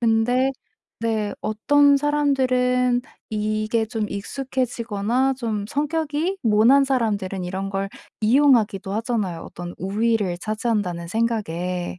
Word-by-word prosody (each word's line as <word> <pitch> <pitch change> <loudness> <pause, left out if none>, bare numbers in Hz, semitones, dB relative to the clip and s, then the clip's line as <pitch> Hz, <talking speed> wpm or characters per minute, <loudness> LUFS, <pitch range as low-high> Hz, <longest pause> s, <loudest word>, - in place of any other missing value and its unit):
근데 240 +3 +2 0.5
네. 220 -3 -1
어떤 285 +6 +4
사람들은 255 -4 +2 0.3
이게 215 +1 0
좀 220 -1 -3
익숙해지거나 245 +1 -1
좀 220 -5 -3
성격이 310 - -1
모난 235 +5 +5
사람들은 205 -8 -1
이런 190 +2 -3
걸 195 0 -3 0.3
이용하기도 225 -5 +3
하잖아요, 215 -6 -2
어떤 175 0 -8
'우위를 205 -1 0
차지한다.'는 210 -5 -2
생각에. 180 -5 -2
225 Hz, 265 characters per minute, -23 LUFS, 200-255 Hz, 0.5 s, 모난